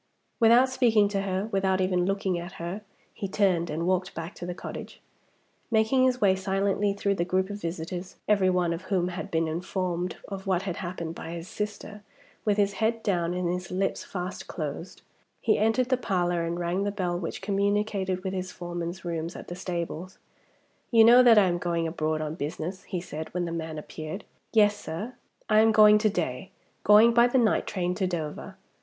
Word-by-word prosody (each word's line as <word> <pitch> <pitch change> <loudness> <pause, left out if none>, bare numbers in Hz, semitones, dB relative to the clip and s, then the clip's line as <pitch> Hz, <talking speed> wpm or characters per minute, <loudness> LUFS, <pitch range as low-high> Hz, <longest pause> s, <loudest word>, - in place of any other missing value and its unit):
Without 235 +2 +6
speaking 235 -5 +3
to 200 -1 -1
her, 195 +1 -2
without 190 -1 +1
even 185 -1 +1
looking 195 -2 0
at 175 +2 -8
her, 175 +5 -5 0.3
he 200 - -4
turned 185 -4 +1
and 160 +3 -2
walked 185 0 0
back 165 +3 -5
to 175 - -7
the 180 - -4
cottage. - - -8 0.7
Making 225 +3 +3
his 255 -1 +2
way 195 -2 +4
silently 195 +1 0
through 200 0 0
the 170 - 0
group 185 +2 0
of 205 0 -6
visitors 175 +2 -5
every 200 -3 +4
one 180 -2 +1
of 165 - -5
whom 185 -2 0
had 185 +2 -6
been 165 -2 0
informed 180 +1 -2
of 195 0 -7
what 185 -1 +1
had 185 -3 -4
happened 170 -3 -5
by 165 0 -7
his 170 0 -7
sister 210 0 -5 0.4
with 210 -1 +2
his 200 -1 +2
head 225 +1 +1
down 175 -3 0
and 180 -1 -1
his 180 0 -3
lips 190 +1 -1
fast 180 0 -6
closed, 155 +1 -6 0.4
he - - +2
entered 225 +4 +2
the 255 - +3
parlor 175 -6 0
and 170 +1 -3
rang 175 +3 -1
the 205 - 0
bell 185 -4 -2
which 165 - -4
communicated 200 -1 0
with 190 -1 -3
his 185 -1 -3
foreman's 175 0 -5
rooms 170 0 -3
at - - -9
the 175 - -5
stables. 180 0 -5 0.7
"You 230 -3 +6
know 240 +3 +8
that 240 -3 +7
I 205 - +7
am 175 -1 0
going 170 -1 -1
abroad 155 -1 -1
on 155 0 -3
business?" 165 +4 -5
he 180 -3 -4
said, 155 -2 -7
when 180 -1 0
the 170 - -4
man 160 -1 -4
appeared. 155 +5 -7 0.3
"Yes, 210 -2 +5
sir." 205 +8 -6 0.3
"I 215 0 +5
am 220 0 +5
going 210 -1 +7
to 215 0 +3
day 175 -4 -3 0.3
going 215 +3 +7
by 235 +1 +6
the 245 - +1
night 230 -4 +2
train 180 -2 -1
to 185 +1 -1
Dover. 170 +2 -5
185 Hz, 200 wpm, -27 LUFS, 175-205 Hz, 0.7 s, know